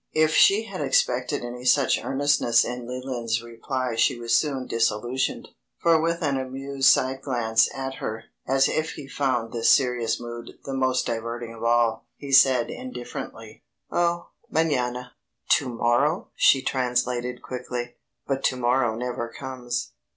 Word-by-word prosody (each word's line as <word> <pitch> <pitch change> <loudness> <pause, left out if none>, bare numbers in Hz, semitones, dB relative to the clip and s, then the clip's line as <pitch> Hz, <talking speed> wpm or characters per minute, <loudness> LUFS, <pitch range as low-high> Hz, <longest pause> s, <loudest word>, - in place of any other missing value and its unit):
'" - - -48
If 155 - -1
she 205 +3 +5
had 225 - -7
expected - - +1
any 125 +1 -7
such 130 +1 +3
earnestness 135 -4 +2
in 125 -1 -5
Leland's 120 -3 -3
reply 125 +2 -3
she 120 +2 +2
was 115 -1 +1
soon 135 -1 0
disillusioned, 115 +3 -1 0.3
for 165 -2 +3
with 170 +1 -1
an 140 -3 +1
amused 135 +1 +1
side 130 +1 +2
glance 115 -4 +2
at 135 0 -5
her, 110 +1 -5 0.2
as 135 +1 +3
if 155 0 -1
he 145 - -9
found 130 -5 -1
this 115 -1 +2
serious 125 -3 +2
mood 120 0 -8
the 135 - -4
most 130 -1 +1
diverting 115 0 -4
of 115 - -10
all, 115 -1 +2
he 140 -1 -8
said 130 -3 +5
indifferently: 120 -3 -8 0.3
"Oh 175 0 0 0.2
mañana." 125 -6 0 0.4
"To 130 - +3
morrow!" 120 +8 +1
she 135 -1 +4
translated 125 -1 -1
quickly. 125 -1 -5 0.3
"But 135 -1 -2
to - - +2
morrow 120 -2 +1
never 120 0 -3
comes." 125 0 -5
125 Hz, 150 wpm, -25 LUFS, 120-135 Hz, 0.4 s, she